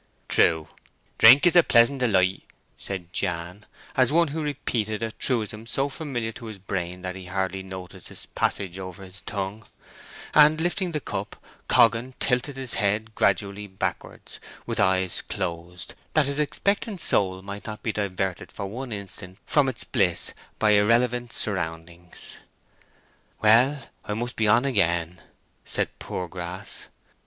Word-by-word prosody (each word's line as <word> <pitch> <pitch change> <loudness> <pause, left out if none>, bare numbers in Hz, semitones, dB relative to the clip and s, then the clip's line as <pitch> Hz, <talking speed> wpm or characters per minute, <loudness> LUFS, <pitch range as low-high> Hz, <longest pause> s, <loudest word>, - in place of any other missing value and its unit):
"True, 80 -1 +3 0.5
drink 130 +8 +9
is 175 - +4
a 175 - +9
pleasant 125 -1 +4
delight," 95 -6 +2 0.3
said 90 -3 -6
Jan, 90 +2 -2 0.3
as 130 -1 +4
one 170 0 +3
who 160 +3 -3
repeated 115 -7 -2
a 115 - -2
truism 110 -3 -1
so 135 +4 0
familiar 130 -6 -4
to 115 +1 -10
his 110 -2 -7
brain 90 -2 -4
that 90 0 -4
he 95 -1 -9
hardly 95 +1 -2
noticed 95 -1 -9
its - - -9
passage 95 -1 -2
over 95 0 -8
his 95 0 -7
tongue; 100 +1 -4 0.7
and, 150 +1 +6
lifting 175 +2 0
the 155 - -1
cup, 100 -6 -5 0.3
Coggan 115 +3 +4
tilted 125 +2 0
his 130 -3 -5
head 105 +2 0
gradually 100 0 0
backwards, 95 0 -5 0.3
with - - -3
closed 90 -2 -1
eyes, - - -17 0.2
that 155 -2 +5
his 140 +2 -2
expectant 200 +6 0
soul 95 - +2
might 100 +1 -7
not 105 -1 -7
be 110 - 0
diverted 95 -3 -3
for 100 - -5
one 120 +6 -6
instant 95 -2 -8
from 145 -3 +3
its 125 - -2
bliss - - +2 0.2
by 105 -1 +3
irrelevant 120 +3 +3
surroundings. 85 -4 -3 1.0
"Well, 125 +6 +4 0.2
I 105 - -3
must 120 +2 -3
be 110 - +1
on 115 +5 +4
again," 85 -8 +1 0.4
said - - -1
Poorgrass. 90 +1 -6
105 Hz, 145 wpm, -25 LUFS, 95-125 Hz, 1.0 s, drink